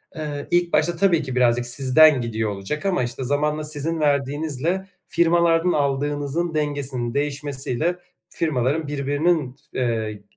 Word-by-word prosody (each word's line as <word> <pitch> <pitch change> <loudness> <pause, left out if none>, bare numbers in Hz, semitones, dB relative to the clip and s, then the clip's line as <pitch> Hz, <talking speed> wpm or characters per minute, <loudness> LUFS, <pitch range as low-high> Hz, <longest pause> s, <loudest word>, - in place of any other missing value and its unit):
eee, 150 -2 -5
ilk 175 0 +2
başta 175 - +2
tabii 170 -3 +3
ki 130 -3 -5
birazcık 120 -1 +3
sizden 135 +3 +5
gidiyor 110 -2 -2
olacak 100 - -5
ama, 185 -8 +1
işte, 120 +2 -4
zamanla 150 +3 0
sizin 155 +2 -3
verdiğinizle, 150 +5 0 0.2
firmalardan 170 0 +3
aldığınızın 145 +3 -1
dengesinin 140 -5 -2
değişmesiyle, 145 +2 -2 0.3
firmaların 150 0 -1
birbirinin 145 0 0 0.2
t - - -3
eee, 110 -4 -2
145 Hz, 125 wpm, -22 LUFS, 130-160 Hz, 0.3 s, sizden